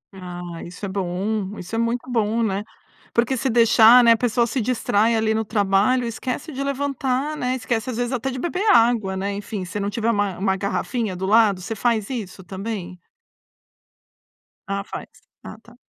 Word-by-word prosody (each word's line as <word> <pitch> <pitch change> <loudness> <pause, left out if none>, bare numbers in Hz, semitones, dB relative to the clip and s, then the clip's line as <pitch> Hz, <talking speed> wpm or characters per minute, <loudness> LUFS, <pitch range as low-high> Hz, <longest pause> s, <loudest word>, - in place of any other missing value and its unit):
Ah, 175 -2 -7
isso 180 +4 -8
é - - -4
bom, 195 +2 -2
isso 180 +4 -9
é - - 0
muito 235 +2 -1
bom, 230 -1 +1
né. 200 -2 -1 0.5
Porque 240 +3 +2
se 265 +2 -1
deixar, 230 +1 +7
né, 235 - +6
a 230 - +5
pessoa 240 0 +1
se 245 +3 -1
distrai 225 -1 +1
ali 220 0 +1
no 220 0 0
trabalho, 205 +4 +2
esquece 250 +6 -4
de 275 -1 -4
levantar, 275 +1 -1
né, 255 -3 -1
esquece 230 -1 -2
às 240 - -4
vezes 245 0 -1
até 260 0 -2
de 260 - -5
beber 360 +7 -2
água, 230 -5 +3
né, 200 +1 -2
enfim, 200 -1 -5
se 180 +4 -5
não 200 0 -1
tiver 230 +2 0
uma 205 -4 -1
uma 190 0 +1
garrafinha 205 +1 -2
do 185 +1 -3
lado, 205 -2 +4
você 210 +5 -5
faz 220 -2 0
isso 205 -6 -6
também? 190 0 -6 1.7
Ah, 200 0 -2
faz. - - -7 0.4
Ah - - -9
tá. 240 +1 -18
220 Hz, 185 wpm, -22 LUFS, 195-245 Hz, 1.7 s, deixar